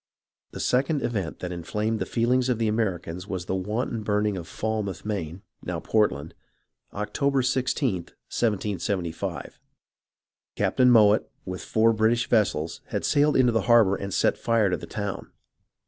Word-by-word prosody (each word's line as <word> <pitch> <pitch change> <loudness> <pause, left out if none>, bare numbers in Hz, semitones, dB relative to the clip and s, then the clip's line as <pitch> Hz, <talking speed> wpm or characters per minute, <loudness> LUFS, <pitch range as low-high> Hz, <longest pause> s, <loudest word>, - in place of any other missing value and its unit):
The - - -9
second 135 +3 +1
event 95 -10 -2
that 90 - -4
inflamed 105 +6 -2
the 95 - -2
feelings 125 +2 +1
of 125 - +1
the 115 -1 0
Americans 95 -5 -2
was 95 -3 -4
the 95 - -2
wanton 110 +5 -2
burning 105 0 0
of 85 -3 -6
Falmouth, 105 -5 -3
Maine 95 -4 -4 0.2
(now - - -3
Portland), 95 -9 0 0.6
October 130 +7 0
i6th, 130 +3 0
1775. 95 - -3 1.0
Captain 125 0 +3
Mowatt 110 -3 +5 0.2
with 95 -1 -5
four 115 +1 +3
British 110 +2 +2
vessels 85 -8 +1
had - - -3
sailed 145 +1 +3
into 125 -2 +4
the 115 - +1
harbour 110 -5 +6
and 100 0 -5
set - - +1
fire 115 -4 +2
to 90 - +1
the - - -9
town. 100 -2 -5
105 Hz, 145 wpm, -26 LUFS, 95-115 Hz, 1.0 s, harbour